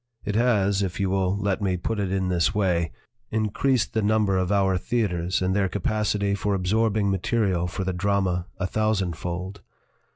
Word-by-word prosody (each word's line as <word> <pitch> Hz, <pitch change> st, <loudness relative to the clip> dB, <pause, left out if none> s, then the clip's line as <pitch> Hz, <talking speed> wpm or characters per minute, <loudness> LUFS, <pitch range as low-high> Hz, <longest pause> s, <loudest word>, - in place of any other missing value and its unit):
It 105 Hz, -, -1 dB
has, 100 Hz, -4 st, +2 dB
if 95 Hz, -1 st, -3 dB
you 95 Hz, -1 st, 0 dB
will 95 Hz, 0 st, +1 dB
let 100 Hz, 0 st, -1 dB
me 95 Hz, -2 st, 0 dB
put 105 Hz, +5 st, -3 dB
it 95 Hz, -2 st, -1 dB
in 95 Hz, -1 st, 0 dB
this 90 Hz, +3 st, +1 dB
way, 85 Hz, -6 st, +1 dB, 0.4 s
increased 110 Hz, +3 st, 0 dB
the 110 Hz, -, +1 dB
number 105 Hz, -2 st, +2 dB
of 95 Hz, 0 st, 0 dB
our 95 Hz, -2 st, +3 dB
theaters 90 Hz, -4 st, -1 dB
in 95 Hz, 0 st, +1 dB
their 95 Hz, -1 st, +1 dB
capacity 100 Hz, 0 st, 0 dB
for 100 Hz, 0 st, 0 dB
absorbing 105 Hz, +2 st, +1 dB
material 95 Hz, -2 st, 0 dB
for 95 Hz, +2 st, -4 dB
the 95 Hz, 0 st, -2 dB
drama 95 Hz, -1 st, 0 dB
a 95 Hz, -, -2 dB
thousandfold. 95 Hz, -2 st, -2 dB
100 Hz, 170 wpm, -25 LUFS, 90-105 Hz, 0.4 s, our